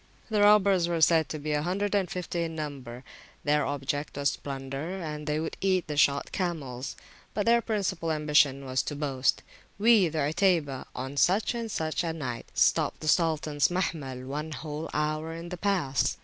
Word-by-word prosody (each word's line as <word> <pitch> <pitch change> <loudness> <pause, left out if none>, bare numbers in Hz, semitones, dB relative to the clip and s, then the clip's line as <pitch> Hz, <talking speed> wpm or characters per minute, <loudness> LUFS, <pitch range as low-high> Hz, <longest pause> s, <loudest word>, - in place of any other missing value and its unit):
The 210 -1 +2
robbers 200 -4 +5
were 170 -1 -1
said 160 0 +4
to 155 - -4
be 150 +1 -4
a 150 0 +1
hundred 190 +5 -1
and 195 -3 +1
fifty 175 -1 -3
in 165 -1 -3
number; 135 -5 -6 0.4
their 150 0 +2
object 145 +1 -3
was 140 0 +1
plunder, 135 +6 -5
and 150 -3 -5
they 150 0 0
would 160 - -4
eat 185 -2 +2
the 150 - -4
shot 140 -1 +2
camels. 145 -9 -3 0.4
But 205 - 0
their 235 0 +5
principal 190 -7 -1
ambition 150 -3 +3
was 130 0 0
the 145 - -5
boast, 135 -3 0 0.3
We, 210 -4 +5
the 155 -2 0
Utaybah, 165 -8 +1
on 130 +3 -5
such 195 - +3
and 230 -1 -4
such 160 -2 -1
a - - -2
[p.145] 160 - -2
night, 125 -7 -5
stopped - - +2
the 155 - -5
Sultans 155 -3 +2
Mahmil 150 -8 -3
one 150 +4 -4
whole 150 +2 -5
hour 155 +2 -2
in 170 +1 -7
the 180 - -5
Pass. 175 - 0
155 Hz, 185 wpm, -28 LUFS, 145-180 Hz, 0.4 s, robbers